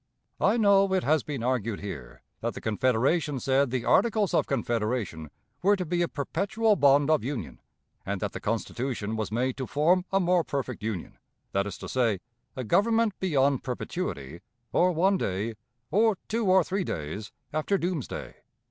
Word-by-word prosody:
I -, -, +3 dB
know 200 Hz, -3 st, +4 dB
it 185 Hz, -, +1 dB
has 155 Hz, +1 st, +3 dB
been 140 Hz, -5 st, -5 dB
argued 115 Hz, -4 st, -1 dB
here -, -, -8 dB, 0.2 s
that -, -, -3 dB
the -, -, -5 dB
Confederation 130 Hz, -, +1 dB
said 135 Hz, +1 st, +2 dB
the 125 Hz, -1 st, -2 dB
Articles 215 Hz, -5 st, +3 dB
of -, -, +2 dB
Confederation 115 Hz, -, -2 dB, 0.3 s
were 200 Hz, +3 st, +4 dB
to 185 Hz, -2 st, -3 dB
be 175 Hz, +2 st, 0 dB
a 170 Hz, -, +2 dB
perpetual 200 Hz, +9 st, 0 dB
bond 145 Hz, -1 st, +4 dB
of 155 Hz, -, +3 dB
union, 115 Hz, -, -5 dB, 0.4 s
and 100 Hz, 0 st, -3 dB
that 105 Hz, -1 st, -2 dB
the -, -, -6 dB
Constitution 115 Hz, 0 st, -2 dB
was 110 Hz, -2 st, -3 dB
made 125 Hz, +3 st, 0 dB
to 130 Hz, -2 st, -4 dB
form 175 Hz, +5 st, +2 dB
a 195 Hz, -, +3 dB
more 180 Hz, -1 st, +3 dB
perfect 140 Hz, -6 st, -4 dB
union; 105 Hz, -5 st, -5 dB, 0.3 s
that 100 Hz, +1 st, 0 dB
is 100 Hz, -, -6 dB
to -, -, -8 dB
say, 115 Hz, -7 st, +1 dB, 0.4 s
a 130 Hz, -, -3 dB
Government 225 Hz, -, +3 dB
beyond 140 Hz, -7 st, +2 dB
perpetuity, 85 Hz, -, -4 dB, 0.3 s
or 180 Hz, +1 st, +4 dB
one 185 Hz, +3 st, +2 dB
day, 100 Hz, +5 st, -2 dB, 0.4 s
or 215 Hz, 0 st, +3 dB
two 225 Hz, -1 st, -1 dB
or 185 Hz, 0 st, +5 dB
three 190 Hz, +3 st, -1 dB
days, 85 Hz, -, -5 dB, 0.2 s
after 155 Hz, +6 st, +1 dB
doomsday. 175 Hz, -7 st, -4 dB
140 Hz, 170 wpm, -27 LUFS, 110-185 Hz, 0.4 s, or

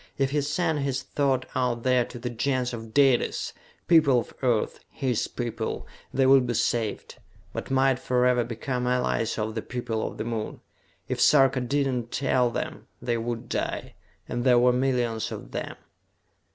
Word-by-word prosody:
If 135 Hz, -1 st, +1 dB
he 145 Hz, 0 st, +1 dB
sent 150 Hz, +2 st, 0 dB
his 135 Hz, -2 st, -1 dB
thought 135 Hz, -3 st, 0 dB
out 125 Hz, -2 st, 0 dB
there 125 Hz, -1 st, +3 dB
to -, -, -10 dB
the 120 Hz, +1 st, -4 dB
Gens 125 Hz, +1 st, -1 dB
of 115 Hz, -1 st, -7 dB
Dalis, 135 Hz, -1 st, +2 dB, 0.3 s
people 155 Hz, -6 st, +6 dB
of -, -, -7 dB
Earth, 120 Hz, -5 st, +1 dB
his 130 Hz, -5 st, -1 dB
people, 115 Hz, -2 st, -4 dB, 0.3 s
they 135 Hz, 0 st, +2 dB
would 130 Hz, -1 st, +6 dB
be 120 Hz, -, -1 dB
saved, 115 Hz, -1 st, -1 dB, 0.4 s
but -, -, -5 dB
might 135 Hz, -1 st, +3 dB
forever 125 Hz, -1 st, +2 dB
become 125 Hz, +2 st, -3 dB
allies 125 Hz, -2 st, 0 dB
of 110 Hz, 0 st, -2 dB
the 110 Hz, -, -3 dB
people 120 Hz, -3 st, -3 dB
of -, -, -8 dB
the -, -, -2 dB
Moon. 115 Hz, -2 st, -4 dB, 0.5 s
If -, -, -2 dB
Sarka 135 Hz, -3 st, +5 dB
did 140 Hz, +3 st, +1 dB
not 125 Hz, -3 st, -2 dB
tell 130 Hz, -2 st, +2 dB
them, 120 Hz, -, -5 dB
they 120 Hz, -1 st, -1 dB
would 115 Hz, 0 st, -4 dB
die -, -, -3 dB, 0.3 s
and 120 Hz, 0 st, -2 dB
there 125 Hz, -2 st, +5 dB
were 125 Hz, +1 st, +5 dB
millions 125 Hz, -4 st, 0 dB
of -, -, -7 dB
them. -, -, -4 dB
125 Hz, 170 wpm, -26 LUFS, 120-135 Hz, 0.5 s, people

